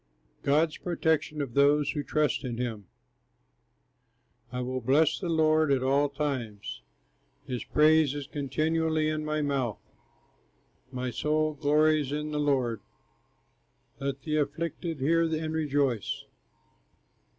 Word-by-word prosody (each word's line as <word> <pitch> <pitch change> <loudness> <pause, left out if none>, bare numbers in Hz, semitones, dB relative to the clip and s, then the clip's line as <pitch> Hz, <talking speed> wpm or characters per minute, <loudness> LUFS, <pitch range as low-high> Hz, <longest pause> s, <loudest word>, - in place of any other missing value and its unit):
GOD'S 155 +3 +2
PROTECTION 160 -3 0
OF 125 -4 -7
THOSE 145 +2 +4
WHO 145 - -2
TRUST 150 +1 0
IN 120 -3 -4
HIM 115 -5 -4 1.7
I 125 - -4
will 130 +1 -3
bless 145 +6 +3
the 180 - -3
Lord 155 -2 +3
at 130 -2 +2
all 140 +2 +2
times, 135 -8 -4 0.6
His 125 -3 -4
praise 155 -2 +4
is 145 -1 -4
continually 155 +3 0
in 155 0 -2
my 155 0 -1
mouth, 135 -6 -1 1.1
My 125 -1 -3
soul 155 +5 0
glories 150 0 +2
in 150 +1 -3
the 150 - -1
Lord, 130 -6 +1 1.2
Let 135 -1 -3
the 155 +1 -1
afflicted 155 +1 -3
hear 165 +4 +3
and 160 -1 -2
rejoice. 145 -7 0
145 Hz, 120 wpm, -28 LUFS, 135-155 Hz, 1.7 s, THOSE